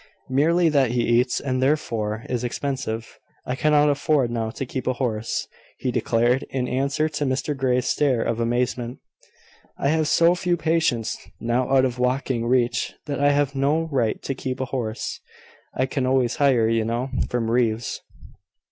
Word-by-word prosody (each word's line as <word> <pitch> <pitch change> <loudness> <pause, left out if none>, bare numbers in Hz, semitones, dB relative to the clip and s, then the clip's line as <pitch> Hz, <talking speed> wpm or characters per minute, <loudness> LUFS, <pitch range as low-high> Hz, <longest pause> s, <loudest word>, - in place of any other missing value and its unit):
"Merely 165 +6 +3
that 140 -6 +2
he 120 -1 +1 0.2
eats, 125 0 -1
and 130 -2 -2
therefore 115 -6 0
is 125 -1 -2
expensive. 125 -3 -4 0.3
I 125 - -2
cannot 150 +1 +3
afford 145 -3 +2
now 115 -2 -2
to 135 - -5
keep 130 0 -5
a 130 - +2
horse," 115 -4 -2 0.3
he 125 - -2
declared, 120 +2 +2
in 130 -2 -2
answer 140 +4 0
to 150 -1 -3
Mr 135 +2 -1
Grey's 125 -2 +1
stare 130 -4 +2
of 115 0 -1
amazement. 120 +1 -1 0.8
"I 140 - 0
have 155 0 +2
so 170 +2 +4
few 180 -1 0
patients 160 -9 0 0.2
now 120 +2 0
out 130 -1 +5
of 125 -1 -3
walking 125 -2 0
reach, 120 -2 +1
that 145 -3 -3
I 145 0 +4
have 145 -1 +1
no 150 +4 +1
right 120 -6 0
to 135 - -2
keep 130 0 -4
a 130 - -1
horse. 115 -4 -3 0.6
I 130 - +1
can 130 -1 -2
always 130 -2 +1
hire, 130 -6 +3
you 115 0 +1
know, 120 +4 -2 0.2
from 115 -2 -1
Reeves." 115 -1 0
130 Hz, 170 wpm, -23 LUFS, 120-140 Hz, 0.8 s, out